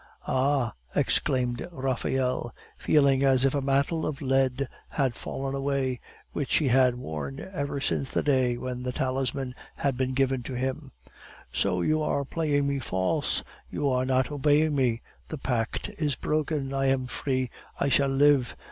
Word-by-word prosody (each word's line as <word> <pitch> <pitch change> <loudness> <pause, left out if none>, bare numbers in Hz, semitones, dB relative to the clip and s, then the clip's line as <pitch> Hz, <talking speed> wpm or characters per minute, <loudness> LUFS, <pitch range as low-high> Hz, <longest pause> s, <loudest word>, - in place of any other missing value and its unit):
"Ah!" 130 -2 +1 0.2
exclaimed 125 +3 +1
Raphael, 130 -3 -1 0.2
feeling 140 -3 +3
as 135 -1 +4
if 135 - +2
a 140 - 0
mantle 140 +4 +1
of 150 -2 -2
lead 135 -1 +1 0.2
had 135 -4 0
fallen 135 +2 -4
away, 135 -2 -1 0.3
which 145 - 0
he 145 -4 +3
had 125 0 +4
worn 75 - -5
ever 140 -4 -2
since 135 0 -1
the - - 0
day 130 -4 +2
when 125 0 -4
the 125 0 -2
talisman 130 0 -1 0.2
had 135 -3 -1
been 130 0 0
given 135 -1 +2
to 125 +2 -6
him; 130 +1 -3 0.6
"so 90 -3 +1
you 155 - +2
are 140 -2 0
playing 145 -1 0
me 140 0 0
false, 95 -6 0 0.3
you 145 - -1
are 130 -1 +2
not 130 +1 +2
obeying 150 +2 +3
me, 125 -4 +1 0.3
the 155 - -4
pact 120 -4 -2
is 150 -4 +1
broken! 150 -2 -1
I 135 0 +1
am 135 -1 +2
free; 130 0 -2 0.3
I - - +2
shall 140 0 +3
live. 135 -2 +3
135 Hz, 160 wpm, -27 LUFS, 125-140 Hz, 0.6 s, as